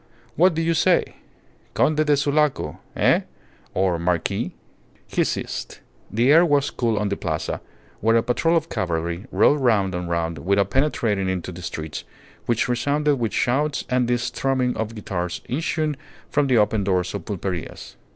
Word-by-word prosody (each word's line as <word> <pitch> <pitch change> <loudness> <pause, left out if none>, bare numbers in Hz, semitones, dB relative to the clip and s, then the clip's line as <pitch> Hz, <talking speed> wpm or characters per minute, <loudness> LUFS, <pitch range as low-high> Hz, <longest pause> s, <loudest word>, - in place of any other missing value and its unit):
What 180 0 +4
do 165 - 0
you 165 +1 +2
say? 175 +2 +2 0.6
Conde 155 0 +3
de 145 -1 +4
Sulaco 145 - +1 0.2
Eh? - - +4 0.5
or 90 -2 +1
marquis.. 85 -1 -1 0.3
." - - -33
He - - +4
ceased. - - -4 0.3
The 120 +6 +3
air 165 +3 +7
was 145 -4 +2
cool 115 -3 0
on 105 -1 0
the 100 - -1
Plaza, - - -3 0.4
where 115 +2 +3
a 115 - +4
patrol 165 +7 +2
of 160 0 -1
cavalry 85 - -2
rode 145 - +4
round 105 -7 +2
and 90 -1 -3
round 85 -2 -1
without 100 +4 +1
penetrating 115 -9 +1
into 90 -1 -3
the 90 +1 -9
streets, 80 -2 -5 0.4
which 120 -1 +1
resounded 145 +4 +1
with 115 -3 -1
shouts 145 +4 0
and 125 -1 +2
the 120 0 +2
strumming 125 +1 0
of 110 +1 -3
guitars 90 -4 -4
issuing 155 +2 -1 0.4
from 145 -1 +2
the 130 -3 +3
open 105 -1 +2
doors 90 -2 0
of 100 -5 -5
pulperias. 95 -4 -5
115 Hz, 165 wpm, -23 LUFS, 95-145 Hz, 0.6 s, air